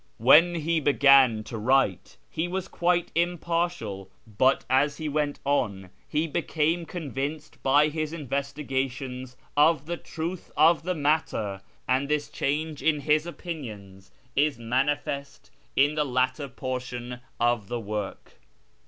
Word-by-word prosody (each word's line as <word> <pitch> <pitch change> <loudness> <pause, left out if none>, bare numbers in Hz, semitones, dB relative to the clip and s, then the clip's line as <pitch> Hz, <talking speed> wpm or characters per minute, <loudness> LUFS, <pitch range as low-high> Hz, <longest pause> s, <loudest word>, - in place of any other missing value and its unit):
When 160 +9 +6
he 165 0 0
began 135 -5 +5
to 115 0 -6
write 130 -5 +1
he 160 +2 -2
was 185 +1 -3
quite 175 0 0
impartial, 170 - -1 0.2
but 125 +5 +2
as 140 +3 +2
he 155 - -4
went 145 -1 -1
on 100 -10 -1 0.2
he 155 +2 +1
became 165 +1 -1
convinced 150 -2 -5
by 145 +3 +4
his 155 0 -3
investigations 135 -3 -3 0.2
of 150 0 +4
the 170 +2 -3
truth 165 +3 -6
of 160 +1 +5
the 180 +3 -2
matter, 145 -10 0 0.3
and 130 +2 +1
this 150 -1 0
change 150 +2 -2
in 150 -2 +2
his 150 +3 +2
opinions 105 - -8 0.3
is 145 -1 +2
manifest 140 +4 -2 0.2
in 145 +2 +4
the 150 -1 +1
later 130 +1 0
portion 125 -1 -5 0.2
of 120 -3 +1
the 120 +2 -3
work. 105 -2 -6
140 Hz, 130 wpm, -26 LUFS, 125-160 Hz, 0.3 s, When